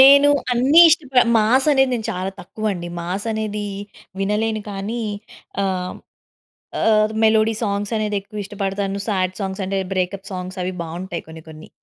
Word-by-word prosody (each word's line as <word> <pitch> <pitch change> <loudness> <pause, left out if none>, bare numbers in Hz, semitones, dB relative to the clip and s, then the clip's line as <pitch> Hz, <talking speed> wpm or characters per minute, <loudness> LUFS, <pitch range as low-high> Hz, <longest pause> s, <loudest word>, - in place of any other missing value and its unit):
నేను 280 +2 +8 0.2
అన్ని 270 +7 +6
ఇష్టప 270 -6 +3 0.2
మాస్ 255 +6 +3
అనేది 265 -1 +3
నేను 220 -2 -3
చాలా 185 +1 -3
తక్కువండి. 195 -2 -4
మాస్ 185 +6 -4
అనేది 210 -1 -3 0.5
వినలేను 215 +2 0
కానీ 210 +4 -4 0.6
ఆహ్, 185 -2 -2 0.9
ఆహ్, 215 -1 +3
మెలోడీ 220 0 +4
సాంగ్స్ 200 0 -1
అనేది 210 -1 -1
ఎక్కువ 205 +1 -7
ఇష్టపడతాను. 195 0 -3
సాడ్ 185 -2 0
సాంగ్స్ 190 0 -3
అంటే 195 0 -1 0.2
బ్రేకప్ 190 +1 -2
సాంగ్స్ 185 +1 -6
అవి 185 - -2
బాగుంటాయి 175 +2 -6
కొన్ని 160 0 -11
కొన్ని. 155 0 -12
205 Hz, 140 wpm, -21 LUFS, 190-220 Hz, 0.9 s, నేను